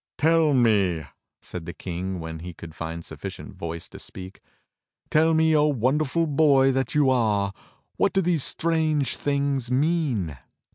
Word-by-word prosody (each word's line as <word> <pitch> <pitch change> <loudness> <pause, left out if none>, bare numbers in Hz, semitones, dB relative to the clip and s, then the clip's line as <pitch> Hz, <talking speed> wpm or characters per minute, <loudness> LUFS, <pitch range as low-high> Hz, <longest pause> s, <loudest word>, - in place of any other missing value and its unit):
"Tell 160 -1 +3
me," 100 - +2 0.4
said 90 -2 -7
the 85 - -6
King 90 +1 -4
when 80 0 -6
he 85 0 -8
could 80 -1 -10
find 85 +1 -6
suflicient - - -8
voice 85 +2 -6
to 95 - -11
speak, 95 0 -10 0.7
"Tell 160 +1 +4
me, 160 0 +3
O 150 0 +4
wonderful 145 +4 +1
boy 140 -3 +4
that 130 0 -2
you 145 -3 +4
are, 105 -5 +1 0.5
wdiat - - +2
do 190 - +3
these 170 -5 +2
strange 155 -4 +1
things 140 -3 -1
mean.? 130 - 0
130 Hz, 150 wpm, -25 LUFS, 90-150 Hz, 0.7 s, Tell